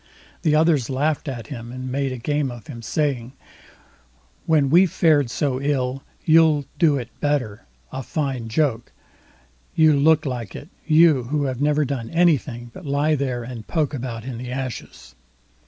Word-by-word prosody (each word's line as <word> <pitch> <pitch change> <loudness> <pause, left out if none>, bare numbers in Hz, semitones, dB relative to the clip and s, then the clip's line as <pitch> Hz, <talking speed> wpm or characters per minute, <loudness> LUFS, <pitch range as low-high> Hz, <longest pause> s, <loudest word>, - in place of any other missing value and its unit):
The 155 -3 +2
others 155 -6 +3
laughed 150 +3 -1
at 120 -5 -5
him, 120 -2 -8
and 130 0 -6
made 130 -3 -2
game 145 0 0
of 120 -2 -9
him, 125 -7 -9
saying: 130 -1 -2 1.1
"When 150 -4 +3
we 180 +4 +6
fared 150 -6 +2
so 130 +1 -1
ill, 135 -2 -1 0.2
you'll 155 -3 +5
do 155 -5 +4
it 125 -2 -5
better—a 110 - -3
fine 135 -4 -3
joke; 120 -1 0 0.8
you 155 -1 +5
look 155 +2 +4
like 120 -6 -4
it—you, 155 -3 +2
who 145 +3 -1
have 130 -1 -3
never 150 0 +2
done 125 -4 -4
anything 145 -8 +1
but 185 - -11
lie 145 +1 +1
there 130 -4 -1
and 115 -2 -8
poke 155 -4 0
about 120 -4 -5
in 125 -3 -6
the 125 0 -6
ashes." 125 - -6
135 Hz, 155 wpm, -22 LUFS, 125-150 Hz, 1.1 s, we